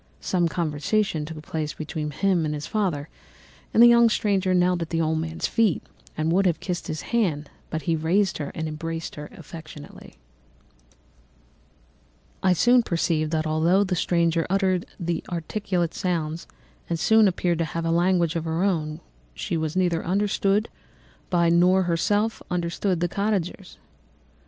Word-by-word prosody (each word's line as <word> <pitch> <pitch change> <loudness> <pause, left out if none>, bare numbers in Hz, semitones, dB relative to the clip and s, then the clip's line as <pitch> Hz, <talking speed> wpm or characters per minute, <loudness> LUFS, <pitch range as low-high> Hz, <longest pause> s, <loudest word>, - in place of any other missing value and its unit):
Some 175 -2 +1
conversation 165 +2 -1
took 155 -1 -8
place 155 -1 -4
between 155 -1 -4
him 180 +3 +1
and 150 -1 -1
his 150 - -5
father, 175 -9 -1 0.6
and 230 - +6
the - - +10
young 235 -1 +6
stranger 195 -4 +1
knelt 180 -1 +2
at 165 - -3
the 165 - -1
old 160 0 +1
man's 160 +1 -3
feet 220 -7 +1 0.3
and 155 +1 0
would 190 +2 +3
have 170 - 0
kissed 180 -2 -4
his 155 - -4
hand, 160 -11 0 0.2
but 160 -1 -4
he 165 +3 +1
raised 170 +4 +1
her 145 - -4
and 160 0 -3
embraced 165 +1 -5
her 150 0 -8
affectionately. 155 - -11 2.3
"I 185 -1 +4
soon 245 +7 +5
perceived 165 -5 0
that 155 0 -1
although 165 +5 +3
the 185 -2 -1
stranger 170 -1 +1
uttered 190 -2 +1 0.4
articulate 175 0 -2
sounds 165 -3 -2 0.4
and 215 +6 +4
appeared 175 -2 0
to 165 - +1
have 165 +1 -4
a 165 - +1
language 175 -1 +2
of 165 -1 -2
her 165 +2 -1
own, 155 -6 -1 0.3
she - - -3
was 160 0 -2
neither 175 -3 +1
understood 200 +2 +1 0.6
by 170 -2 +3
nor 180 +3 +4
herself 205 +6 0
understood 175 +1 -1
the 175 - +2
cottagers. 195 -1 -2
170 Hz, 150 wpm, -24 LUFS, 160-190 Hz, 2.3 s, the